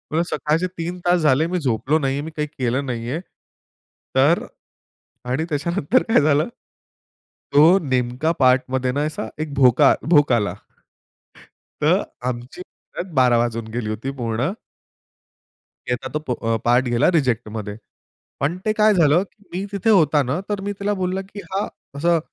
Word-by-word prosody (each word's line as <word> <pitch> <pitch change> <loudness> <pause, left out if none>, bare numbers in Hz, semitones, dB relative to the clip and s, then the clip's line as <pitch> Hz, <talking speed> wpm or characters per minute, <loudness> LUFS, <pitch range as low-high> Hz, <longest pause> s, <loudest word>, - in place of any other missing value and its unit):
बोलला 170 - +3
सकाळचे 165 +2 -1
3 170 +2 -4
तास 175 0 +4
झाले 150 +1 +3
मी 180 +1 -1
झोपलो 135 +2 +1
नाही 135 -2 0
आहे, 145 - -2
मी 160 - -7
काही 150 0 -2
केलं 130 -1 -2
नाही 120 -2 -4
आहे. 160 - -2 1.0
तर 145 +6 +3 0.8
आणि 145 +6 0
त्याच्यानंतर 170 - +1
काय 225 - +3
झालं 150 +1 +2 1.1
तो 145 - +7 0.2
नेमका 130 0 0
पार्टमध्ये 130 0 +2
ना 140 +3 -1
असा 155 -7 -4
एक 155 -2 -4
भोका 135 +1 +5 0.2
भोक 145 -5 +5
आला. 105 -6 +1 1.3
तर - - +3 0.3
आमची 125 +7 -5
परत 180 0 -10
बारा 125 -2 +4
वाजून 115 -1 -1
गेली 115 -3 -3
होती 115 +6 -4
पूर्ण. 120 +5 -1 1.4
त्याचा 125 +1 -2
तो 150 - 0
प - - -1
अ, 115 0 +2
पार्ट 120 +2 +3
गेला 120 +7 +3
रिजेक्टमध्ये. 115 - -1 0.6
पण 150 +6 -1
ते 215 - +2
काय 215 0 +5
झालं 170 0 +4
की 205 +1 -22
मी 190 +3 -3
तिथे 200 +2 -1
होताना 150 - +3
तर 205 -2 -2
मी 205 +1 -3
तिला 205 +1 0
बोलला 185 0 -2
की 200 +1 -11
हा 195 +2 -1 0.3
असं 170 +3 +2
145 Hz, 155 wpm, -21 LUFS, 125-175 Hz, 1.4 s, तो